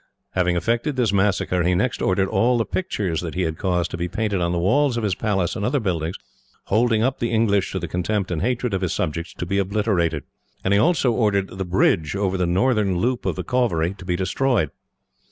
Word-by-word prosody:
Having 90 -1 +1
effected 115 - 0
this 120 -6 +1
massacre, 95 -2 +1
he 90 +1 +2
next 120 +7 0
ordered 95 +1 +2
all 120 +5 +2
the 115 - +1
pictures 100 - -2
that 85 -1 -5
he 90 - 0
had 80 -1 -3
caused 90 -2 0
to - - -4
be 85 +1 -2
painted 100 +1 -1
on 85 0 +1
the 90 - 0
walls 125 +9 +2
of 115 - -2
his 100 -3 +1
palace 95 -4 -1
and 105 - -3
other 135 +6 +1
buildings, 85 -6 -2 0.5
holding 110 +1 +2
up 130 +2 0
the 115 - -1
English 110 -4 +2
to - - -3
the 85 -1 -3
contempt 90 +3 -1
and 80 -3 -1
hatred 125 -2 -1
of 95 - -1
his 90 - -1
subjects, 85 +1 -2
to - - -4
be 100 +3 0
obliterated; 95 - 0 0.4
and 95 - +2
he 100 - +4
also 155 -3 +3
ordered 105 -4 +1
the 95 0 -3
bridge 90 -2 +1
over 100 -1 0
the 90 -2 0
northern 100 0 +2
loop 120 +6 -1
of - - 0
the - - -4
Cauvery 100 -10 0
to 100 - -12
be 90 -1 -1
destroyed. 95 - 0
95 Hz, 225 wpm, -22 LUFS, 90-115 Hz, 0.5 s, he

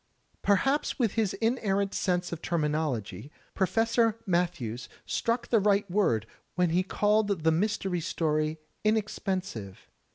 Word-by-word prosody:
Perhaps 270 +9 +2
with 235 -7 +2
his 220 -4 0
inerrant 200 -4 0
sense 180 -2 0
of 170 -1 -5
terminology. 150 - -2 0.2
Professor 225 +3 +2
Matthews 170 - -1 0.2
struck 235 +1 -1
the 230 - +4
right 200 0 +2
word 120 - +2 0.3
when 180 -2 +2
he 175 +2 +3
called 205 -2 +1
the 160 - +4
Mystery 190 +1 0
Story 155 -1 0 0.3
inexpensive. 195 - -2
190 Hz, 120 wpm, -28 LUFS, 160-215 Hz, 0.3 s, the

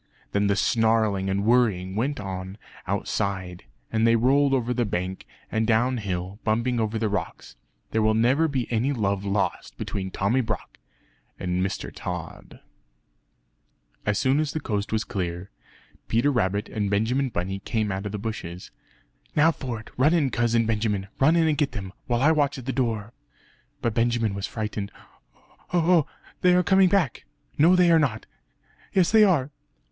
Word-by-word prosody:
Then 100 0 +1
the 100 - +2
snarling 110 -3 +2
and 100 +1 0
worrying 105 -6 +2
went 135 +7 -1
on 95 0 -6 0.3
outside; 95 -5 -2 0.3
and 110 +1 +2
they 115 - +5
rolled 135 +4 +3
over 125 -2 +1
the 120 0 +1
bank, 95 -3 -3 0.2
and 110 0 0
down 120 +3 +2
hill, 95 -1 -4
bumping 115 +2 0
over 110 0 -1
the 110 0 0
rocks. 100 -5 -4 0.4
There 110 - +1
will 110 0 +3
never 130 +8 +3
be 135 -5 -1
any 120 +5 +1
love 100 -5 -1
lost 100 0 -2
between 95 -2 -4
Tommy 100 +8 +1
Brock 105 -5 -5 0.6
and 90 0 -1
Mr. 95 - -3
Tod. 90 -3 -7 1.4
As 105 -1 0
soon 135 +2 +2
as 155 -2 -1
the 155 - -2
coast 105 -6 -3
was 110 0 0
clear, 90 -3 -4 0.6
Peter 120 +6 +2
Rabbit 105 -4 0
and 105 -3 -2
Benjamin 120 +7 +1
Bunny 95 -1 -3
came 105 +1 -2
out 95 +2 -3
of - - -6
the 105 - -3
bushes 95 -5 -6 0.6
"Now 155 +2 +5
for 125 -7 -5
it! 110 - -13
Run 150 +7 +4
in, 145 -6 +2
Cousin 115 -1 +2
Benjamin! 105 -3 -1
Run 155 +5 +5
in 165 -1 +3
and 155 -1 +1
get 140 -5 +1
them! 95 -4 -6
while 120 +1 +1
I 155 - +6
watch 145 -2 +1
at 130 - -8
the 135 - -2
door." 115 -4 -2 0.7
But 115 - +1
Benjamin 115 -2 +1
was 100 0 -3
frightened 105 -2 -4 0.4
"Oh; - - -30 0.3
oh! 170 -2 +3 0.3
they 180 0 +5
are 180 - +4
coming 190 0 +5
back!" 175 -11 0 0.3
"No 170 +5 +6
they 180 -1 +5
are 165 - +6
not." 120 -8 -1 0.7
"Yes 185 -3 +3
they 220 0 +7
are!" 155 -9 +2
110 Hz, 175 wpm, -25 LUFS, 100-135 Hz, 1.4 s, they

